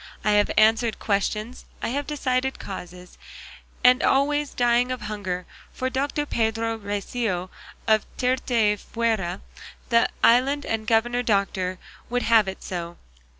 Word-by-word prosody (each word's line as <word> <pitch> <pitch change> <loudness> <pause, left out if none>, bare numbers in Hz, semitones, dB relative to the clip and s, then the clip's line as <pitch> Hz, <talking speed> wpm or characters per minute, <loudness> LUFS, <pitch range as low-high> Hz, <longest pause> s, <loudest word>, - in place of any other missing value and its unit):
I 210 - +2
have 205 0 +3
answered 220 +1 +4
questions, 215 +3 -2 0.2
I - - -2
have 280 +3 -2
decided 265 -3 -1
causes, 180 -1 -9 0.6
and 250 +1 +6
always 290 +1 +2
dying 245 +1 +2
of 255 - -4
hunger, 190 -4 -4 0.3
for 260 0 -2
Doctor 285 +3 -1
Pedro 225 -2 -1
Recio 200 -2 -3 0.4
of 220 -1 +2
Tirteafuera, 225 -5 0 0.5
the 230 -1 +4
island 270 +4 +4
and 220 -1 -2
governor 240 +2 +2
doctor, 195 -5 0 0.3
would 245 +1 0
have 225 -3 +4
it 190 - -6
so. 170 -2 -5
225 Hz, 125 wpm, -24 LUFS, 200-250 Hz, 0.6 s, and